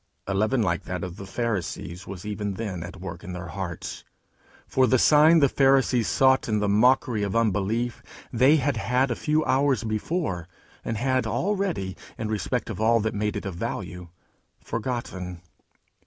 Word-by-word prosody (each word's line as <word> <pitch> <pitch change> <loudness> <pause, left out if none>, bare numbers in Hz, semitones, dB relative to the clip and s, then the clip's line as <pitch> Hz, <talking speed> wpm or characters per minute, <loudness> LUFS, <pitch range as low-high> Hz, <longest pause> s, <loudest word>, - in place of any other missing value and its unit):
A 100 - -2
leaven 110 +5 +2
like 85 -3 -1
that 90 -1 -4
of 90 0 -6
the 100 - -8
Pharisees 95 -4 -3
was 100 0 -8
even 105 -1 -3
then 95 -5 -4
at 90 +2 -8
work 85 -2 -7
in 90 - -6
their 90 -1 -6
hearts; 85 0 -5 0.6
for 130 -1 +2
the 130 - +4
sign 155 +5 +6
the 140 - +6
Pharisees 135 -3 +3
sought 130 -2 +3
in 105 - +2
the 105 0 0
mockery 115 +2 +3
of 100 +1 -2
unbelief, 115 +2 0 0.3
they 130 +6 +5
had 140 -3 +1
had 125 +6 +1
a - - 0
few 155 +4 0
hours 135 -1 +2
before, 110 - -2 0.4
and 115 - -3
had 130 0 +1
already, 170 - -1 0.2
in 110 -1 -3
respect 105 -3 -2
of - - -5
all 115 +1 +4
that 110 +1 -1
made 105 0 -1
it - - -4
of 95 - -3
value, 90 +1 -5 0.5
forgotten. 105 -7 -4
110 Hz, 170 wpm, -25 LUFS, 95-130 Hz, 0.6 s, sign